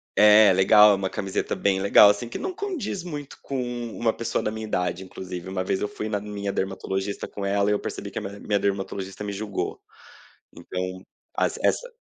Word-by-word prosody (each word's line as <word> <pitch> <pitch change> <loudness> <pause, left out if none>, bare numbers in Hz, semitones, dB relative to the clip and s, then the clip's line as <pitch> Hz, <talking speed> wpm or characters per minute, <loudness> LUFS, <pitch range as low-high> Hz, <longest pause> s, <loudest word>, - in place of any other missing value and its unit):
É 105 -1 +7
legal, 105 +3 +7
é - - +5
uma 95 -1 -2
camiseta 95 -1 -2
bem 95 -1 +1
legal, 100 +1 +8
assim, 115 +3 -5
que - - -5
não 375 -1 -4
condiz 345 - -4
muito 145 -5 -7
com 135 - -4 0.4
uma 115 -1 +1
pessoa 115 - -2
da 105 - -1
minha 110 0 -5
idade, 90 -1 -1
inclusive 90 -1 -7
uma 95 -1 -2
vez 95 +1 -1
eu 105 - 0
fui 110 - -5
na 105 -1 -1
minha 100 -1 -4
dermatologista 95 +1 -3
com 100 - -7
ela 100 +1 +1
e - - +4
eu 105 - 0
percebi - - -6
que - - -4
a - - -7
minha 100 +1 -7
minha 100 -1 0
dermatologista 95 0 -3
me 100 - -4
julgou, 100 0 -4 0.7
então 95 +1 -5 0.3
as - - 0
essa - - +1
100 Hz, 205 wpm, -25 LUFS, 95-110 Hz, 0.7 s, legal